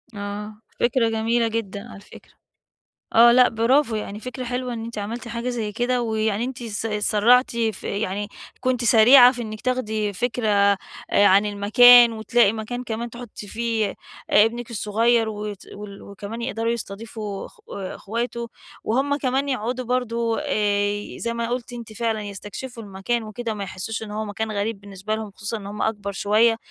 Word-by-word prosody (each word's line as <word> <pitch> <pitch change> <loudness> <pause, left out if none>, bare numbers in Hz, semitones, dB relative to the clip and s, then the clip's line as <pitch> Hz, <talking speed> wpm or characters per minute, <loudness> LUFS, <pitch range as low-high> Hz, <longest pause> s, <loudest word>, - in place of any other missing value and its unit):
آه 210 +1 -6 0.2
فكرة 240 -1 +2
جميلة 225 +1 +1
جدًا 220 -1 -4
على 195 - -10
فكرة. - - -16 0.8
آه 235 +1 +8
لأ 250 0 +6
برافو 235 +3 +2
يعني 210 0 -5
فكرة 255 +2 -6
حلوة 250 0 -3
إن 225 -1 -5
أنتِ 230 -2 -7
عملتِ 230 +4 -5
حاجة 235 +2 -3
زي 225 -4 -3
كده، 245 +3 0
ويعني 220 -1 0
أنتِ 255 -1 -6
س 225 -1 -4
سرّعتِ 215 +4 +3
في 220 -3 -2
يعني 205 0 -2 0.3
كنتِ 255 -2 0
سريعة 245 +3 +8
في 245 -2 -5
إنِّك 215 -1 -7
تاخدي 220 -5 -1
فكرة 230 +2 -1
آآ 200 -1 +4 0.5
عن 200 +2 +5
المكان، 235 +4 +7
وتلاقي 220 -1 +3
مكان 225 +3 -5
كمان 235 0 -4
تحطّي 235 -3 -9
فيه 225 -2 -1 0.4
ابنِك 230 +3 +3
الصغير 225 +1 +2
وت 210 -2 -6
وال 200 -1 -9
وكمان 205 +4 -7
يقدروا 230 -2 -1
يستضيفوا 215 -2 -6
أخ - - -19
أخواته، 235 +5 -4 0.4
وهُم 270 +5 +1
كمان 275 0 0
يقعدوا 255 0 -2
برضه 235 -2 -1
آآ 205 -6 -1
زي 235 0 -2
ما 235 0 -2
قلتِ 245 0 -3
أنتِ 235 -2 -8
فعلًا 220 -1 -1
يستكشفوا 205 +5 -7
المكان 205 +4 -2
وكده 220 +2 -5
وما 205 -2 -4
يحسّوش 195 +4 -5
إن 215 - -7
هو 215 +1 -3
مكان 215 +1 -4
غريب 205 0 -2
بالنسبة 200 +1 -5
لهم 220 -1 -5
خصوصًا 205 +3 -5
إن 205 -2 -8
هُم 205 +1 -5
أكبر 205 -2 -2
شوية، 220 +4 +3
225 Hz, 165 wpm, -23 LUFS, 210-240 Hz, 0.8 s, آه